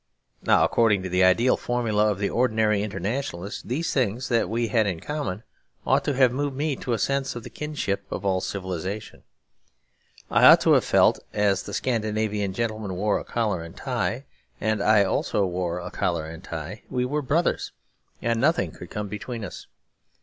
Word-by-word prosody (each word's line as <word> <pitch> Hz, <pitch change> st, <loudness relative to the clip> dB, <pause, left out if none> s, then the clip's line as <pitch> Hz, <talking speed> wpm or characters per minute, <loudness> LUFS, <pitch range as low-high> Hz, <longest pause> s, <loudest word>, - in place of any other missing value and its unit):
Now, -, -, +4 dB
according 105 Hz, -5 st, +3 dB
to 95 Hz, -, -4 dB
the 90 Hz, +1 st, +3 dB
ideal 115 Hz, +8 st, +4 dB
formula 110 Hz, -4 st, +1 dB
of 105 Hz, -, -1 dB
the 100 Hz, 0 st, 0 dB
ordinary 110 Hz, -4 st, +2 dB
internationalist, 100 Hz, -1 st, -4 dB
these 155 Hz, +7 st, -1 dB
things 125 Hz, -1 st, 0 dB
that 115 Hz, -1 st, +2 dB
we 115 Hz, +1 st, -1 dB
had 110 Hz, -4 st, +2 dB
in 90 Hz, -4 st, -2 dB
common 135 Hz, -, -4 dB, 0.4 s
ought -, -, +3 dB
to 145 Hz, -, 0 dB
have 130 Hz, -2 st, +5 dB
moved 140 Hz, +1 st, -2 dB
me 150 Hz, 0 st, 0 dB
to 125 Hz, -, -2 dB
a -, -, +1 dB
sense 135 Hz, +4 st, -1 dB
of 120 Hz, -, -6 dB
the -, -, -10 dB
kinship 100 Hz, -10 st, -3 dB
of -, -, -4 dB
all 95 Hz, -1 st, +1 dB
civilisation. 95 Hz, +2 st, -5 dB, 1.1 s
I -, -, +5 dB
ought -, -, +9 dB
to -, -, +3 dB
have -, -, +4 dB
felt -, -, +4 dB
that -, -, -4 dB
as 100 Hz, -2 st, +3 dB
the -, -, -8 dB
Scandinavian 110 Hz, -4 st, -1 dB
gentleman 110 Hz, -3 st, -3 dB
wore 105 Hz, +3 st, +1 dB
a -, -, -7 dB
collar 105 Hz, -7 st, -1 dB
and 85 Hz, 0 st, -10 dB
tie, -, -, -2 dB, 0.3 s
and 110 Hz, -1 st, 0 dB
I 105 Hz, 0 st, +5 dB
also 100 Hz, +1 st, 0 dB
wore 90 Hz, -1 st, -2 dB
a 90 Hz, -, -7 dB
collar 85 Hz, -3 st, -1 dB
and 80 Hz, +2 st, -9 dB
tie, 85 Hz, +2 st, -6 dB
we 125 Hz, -1 st, 0 dB
were 150 Hz, +4 st, -1 dB
brothers 155 Hz, +6 st, 0 dB, 0.5 s
and 115 Hz, -1 st, +1 dB
nothing 130 Hz, -, +2 dB
could 90 Hz, -, -11 dB
come 105 Hz, 0 st, -4 dB
between 110 Hz, +2 st, -5 dB
us. -, -, -9 dB
105 Hz, 185 wpm, -25 LUFS, 95-125 Hz, 1.1 s, ought